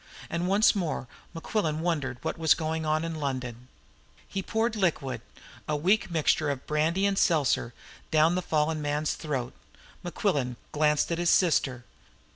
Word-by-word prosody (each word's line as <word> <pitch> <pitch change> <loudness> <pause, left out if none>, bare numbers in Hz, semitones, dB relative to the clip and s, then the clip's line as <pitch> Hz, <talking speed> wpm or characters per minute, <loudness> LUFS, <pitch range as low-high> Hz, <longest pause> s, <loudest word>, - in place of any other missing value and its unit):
And 170 +2 -1
once 200 +3 +5
more 165 -8 -2 0.3
Mequillen 165 -2 -1
wondered 150 -7 -1
what 160 - -2
was 160 -2 +4
going 160 -1 -2
on 155 +1 +1
in 165 - -3
London. 125 -4 -4 0.5
As - - -25
he 195 - -2
poured 225 +3 -1
liquid 145 - -1 0.5
a 150 - 0
weak 190 +8 +2
mixture 155 -2 +1
of 140 -2 -3
brandy 160 +6 +1
and 200 -1 +1
seltzer 145 -8 +2 0.4
down 155 +2 +4
the 185 - 0
fallen 155 -2 0
man's 150 +1 0
throat, 135 -6 -4 0.5
Mequillen 145 - -1 0.2
glanced 150 +1 +2
at 170 - -1
his 175 -1 +2
sister. 135 -8 +2
155 Hz, 155 wpm, -28 LUFS, 145-175 Hz, 0.5 s, once